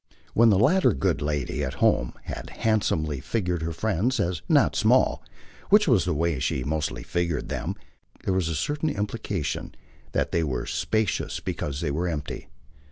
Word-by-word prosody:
When 115 +1 +6
the 100 - +5
latter 160 - +4
good 65 +1 0
lady, 75 -1 -1
at 65 - -3
home, - - +2
had - - -6
handsomely 80 -10 0
figured 90 - -1
her 80 +1 -2
friends 110 +7 0
as 90 -5 0
not - - +4
small - - +3 0.5
which 210 0 +6
was 115 - +4
the 90 - 0
way 80 -2 0
she 65 0 -1
mostly 75 +2 -2
figured 85 -3 -2
them - - -3 0.5
there 95 - +1
was 90 -3 +1
a 80 - -2
certain 150 - -1
implication 105 - -3 0.4
that - - 0
they 85 - +1
were 65 -5 -2
spacious 110 -3 -1
because 70 0 -4
they 75 -4 -1
were 85 +5 -1
empty. 75 -4 -4
85 Hz, 165 wpm, -26 LUFS, 75-110 Hz, 0.5 s, When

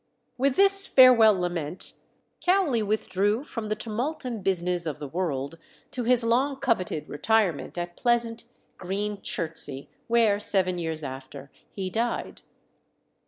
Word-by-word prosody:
With 260 +1 +1
this 390 0 +5
farewell 230 -6 +6
lament 175 -2 -4 0.5
Cowley 355 - +2
withdrew 210 +2 0
"from 230 -7 -6
the 215 - 0
tumult 240 +8 -4
and 230 -5 -5
business 180 -2 -1
of 150 - -4
the 145 - -7
world," 160 -2 -3 0.3
to 245 -2 -3
his 245 0 +5
long 255 +5 +1
coveted 230 - -1
retirement 185 0 0
at 175 0 -5
pleasant, 235 -1 0 0.3
green 200 +2 -3
Chertsey, 155 -5 -1 0.2
where, 225 -3 +3
seven 185 -3 +1
years 160 -2 -3
after, 135 0 -8 0.2
he 190 -2 -5
died. 235 +3 -3
205 Hz, 130 wpm, -26 LUFS, 175-240 Hz, 0.5 s, farewell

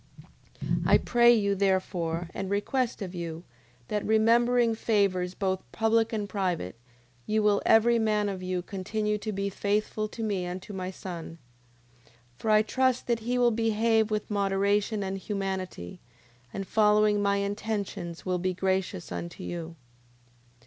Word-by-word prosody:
9:26. - - 0
I - - +7
pray 240 0 +4
you, 205 -4 +3
therefore, 185 -3 0
and 195 -1 -4
request 230 +3 -1
of 185 -1 -6
you, 170 -1 -5 0.5
that, 210 -1 -1
remembering 230 +2 +3
favours 195 -5 +1
both 190 -2 -1
public 225 0 +2
and 210 -3 -2
private, 180 - -2 0.5
you 215 0 +1
will 205 -1 +3
every 230 +1 +5
man 210 -2 +1
of 195 -2 -4
you 185 -1 -2
continue 210 +3 -2
to 215 - -4
be 200 0 -2
faithful 210 +2 -1
to 225 +2 -7
me 200 -4 -1
and 180 +1 -4
to 205 - -9
my 185 -1 -4
son. 175 -3 -7 0.7
9:27. - - -25 0.3
For 220 - -2
I 215 0 +6
trust 260 +2 +1
that 235 -2 0
he 240 +3 -1
will 245 -1 +4
behave 225 0 +2
with 215 0 -2
moderation 200 +1 +1
and 195 0 -3
humanity, 190 - -4 0.5
and 195 - -4
following 210 0 +3
my 200 0 +2
intentions, 200 -4 -3
will 180 -1 0
be 185 +1 -1
gracious 190 -1 -1
unto 170 0 -6
you. 170 -1 -6
205 Hz, 155 wpm, -28 LUFS, 185-220 Hz, 0.7 s, I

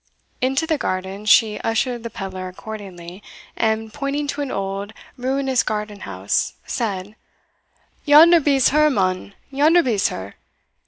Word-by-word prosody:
Into 270 +5 +1
the 315 -2 -1
garden 190 +2 -3
she 215 0 +4
ushered 240 +2 -1
the 230 - -6
pedlar 190 -3 -6
accordingly, 185 -2 -9 0.3
and 220 -1 -1
pointing 290 0 -2
to 285 +1 -3
an 280 - -3
old, 195 +1 -4 0.2
ruinous 265 0 0
garden 210 -1 -4
house, 95 - -2
said, 205 -3 -3 0.9
"Yonder 325 +4 +7
be's 275 -4 +3
her, 305 +1 +4
mon 190 -4 -1 0.2
yonder 310 +5 +4
be's 220 -8 +1
her. 95 +1 -7
220 Hz, 130 wpm, -21 LUFS, 195-275 Hz, 0.9 s, Yonder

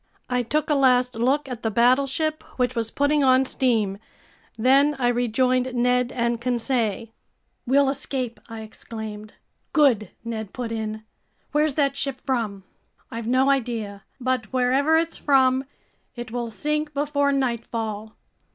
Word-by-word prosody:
I 250 0 +2
took 300 +5 -1
a - - +5
last 250 -3 +3
look 265 +6 +1
at 245 -3 -6
the 225 - 0
battleship, 275 +7 +2 0.2
which 250 -1 +1
was 225 -1 -1
putting 285 +3 +1
on 260 0 +5
steam. 220 -7 0 0.6
Then 275 +5 +4
I 250 -2 +1
rejoined 250 +1 +1
Ned 250 0 +2
and 235 -1 -1
Conseil. 235 -3 -1 0.6
"We'll 275 +2 +4
escape!" 265 -3 -3
I 225 -1 -7
exclaimed. 215 -1 -8 0.4
"Good," 260 -9 +3
Ned 220 -3 -5
put 245 -3 -4
in. 220 -1 -4 0.5
"Where's 300 -1 +1
that 280 -2 +1
ship 275 -2 -3
from?" 225 -7 -2 0.5
"I've 230 -1 -5
no 260 +3 +3
idea. 225 -6 -2 0.2
But 255 -3 -1
wherever 265 +5 +3
it's 330 0 -1
from, 265 -1 +3 0.5
it 240 -2 -7
will 240 -1 -3
sink 300 +5 -2
before 285 0 +1
nightfall. 225 -5 -2
250 Hz, 140 wpm, -24 LUFS, 230-275 Hz, 0.6 s, a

